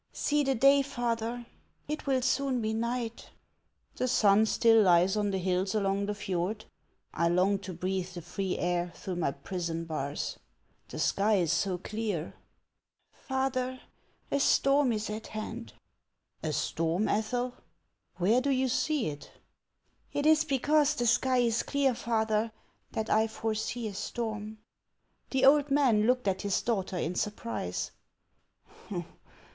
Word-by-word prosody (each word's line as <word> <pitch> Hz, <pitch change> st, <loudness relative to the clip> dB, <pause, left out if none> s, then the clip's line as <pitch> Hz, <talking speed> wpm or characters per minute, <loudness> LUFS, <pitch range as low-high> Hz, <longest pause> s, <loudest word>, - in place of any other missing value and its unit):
" -, -, -48 dB
See 295 Hz, 0 st, +3 dB
the 270 Hz, -1 st, +1 dB
day, 275 Hz, +4 st, +6 dB
father! 240 Hz, -3 st, -2 dB, 0.4 s
It 300 Hz, -1 st, -4 dB
will 260 Hz, -2 st, +2 dB
soon 265 Hz, 0 st, +1 dB
be 220 Hz, -1 st, -1 dB
night." 235 Hz, 0 st, -3 dB, 0.7 s
"The 255 Hz, -, 0 dB
sun 215 Hz, -3 st, +4 dB
still 225 Hz, 0 st, +5 dB
lies 180 Hz, 0 st, +4 dB
on 210 Hz, -1 st, +1 dB
the 195 Hz, -, -1 dB
hills 185 Hz, +2 st, 0 dB
along 200 Hz, -1 st, 0 dB
the 210 Hz, -, -2 dB
fjord. 195 Hz, +1 st, -3 dB, 0.5 s
I 170 Hz, -, +1 dB
long 185 Hz, +3 st, +2 dB
to 190 Hz, -1 st, -7 dB
breathe 185 Hz, +1 st, -2 dB
the 175 Hz, -, -7 dB
free 185 Hz, +2 st, -3 dB
air 175 Hz, 0 st, -1 dB
through 185 Hz, -2 st, -5 dB
my 170 Hz, -, +1 dB
prison 165 Hz, +2 st, -4 dB
bars. 150 Hz, -3 st, -4 dB, 0.5 s
The -, -, -7 dB
sky 210 Hz, +2 st, +2 dB
is 175 Hz, -5 st, +2 dB
so 180 Hz, +1 st, 0 dB
clear! 205 Hz, -4 st, -3 dB, 0.3 s
" -, -, -56 dB
" -, -, -49 dB, 0.2 s
Father, 260 Hz, -1 st, -1 dB, 0.5 s
a 280 Hz, -, +2 dB
storm 275 Hz, -1 st, +3 dB
is 215 Hz, -1 st, -2 dB
at 220 Hz, +1 st, -6 dB
hand." 225 Hz, +2 st, -6 dB, 0.4 s
" -, -, -50 dB
A 155 Hz, -, -1 dB
storm, 165 Hz, +6 st, 0 dB
Ethel! 245 Hz, +4 st, -1 dB, 0.6 s
Where 215 Hz, +8 st, +3 dB
do 280 Hz, -, -1 dB
you 260 Hz, -1 st, +2 dB
see 300 Hz, +2 st, 0 dB
it? 145 Hz, -1 st, -9 dB, 0.3 s
" -, -, -54 dB
" -, -, -38 dB
Tt 290 Hz, -, 0 dB
is 310 Hz, 0 st, +5 dB
because 295 Hz, +1 st, +2 dB
the 240 Hz, -, -1 dB
sky 250 Hz, +2 st, +3 dB
is 235 Hz, -2 st, +2 dB
clear, 280 Hz, -2 st, +1 dB
father, 220 Hz, -1 st, 0 dB, 0.4 s
that 220 Hz, 0 st, -2 dB
I 220 Hz, +1 st, +4 dB
foresee 220 Hz, +1 st, -3 dB
a 205 Hz, -, -6 dB
storm." 215 Hz, 0 st, -4 dB, 0.7 s
The 265 Hz, -1 st, +2 dB
old 290 Hz, +1 st, +5 dB
man 250 Hz, -7 st, +3 dB
looked 250 Hz, -2 st, +2 dB
at 190 Hz, -1 st, 0 dB
his 200 Hz, -2 st, 0 dB
daughter 195 Hz, -5 st, -1 dB
in 170 Hz, 0 st, -1 dB
surprise. 210 Hz, -, -3 dB
220 Hz, 155 wpm, -30 LUFS, 190-255 Hz, 0.7 s, day